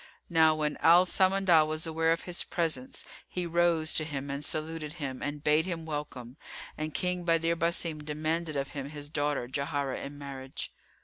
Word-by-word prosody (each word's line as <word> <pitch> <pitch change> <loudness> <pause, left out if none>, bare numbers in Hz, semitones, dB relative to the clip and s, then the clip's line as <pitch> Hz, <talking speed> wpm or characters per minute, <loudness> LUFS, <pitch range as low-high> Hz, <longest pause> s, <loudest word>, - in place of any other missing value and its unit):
Now 160 -1 +5
when 150 -1 -1
Al 175 +2 +6
Samandal 185 -4 +4
was 155 +1 -1
aware 160 0 +1
of 165 - 0
his 175 -1 -1
presence, 155 -7 -2 0.2
he 180 -1 -3
rose 170 -2 +2
to 155 - +3
him 140 -2 -4
and 140 +1 -4
saluted 155 0 -2
him 140 -6 -5
and 145 0 -4
bade 155 +3 +3
him 165 -3 -4
welcome; 145 -5 -5 0.4
and 155 0 -3
King 180 +2 -1
Badr 165 -1 +2
Basim 165 -2 0
demanded 155 +2 -2
of 140 -1 -1
him 140 -1 -5
his 145 -1 -6
daughter 145 -4 0
Jauharah 140 0 -2
in 140 +1 -7
marriage. 135 -2 -7
155 Hz, 175 wpm, -30 LUFS, 145-165 Hz, 0.4 s, Al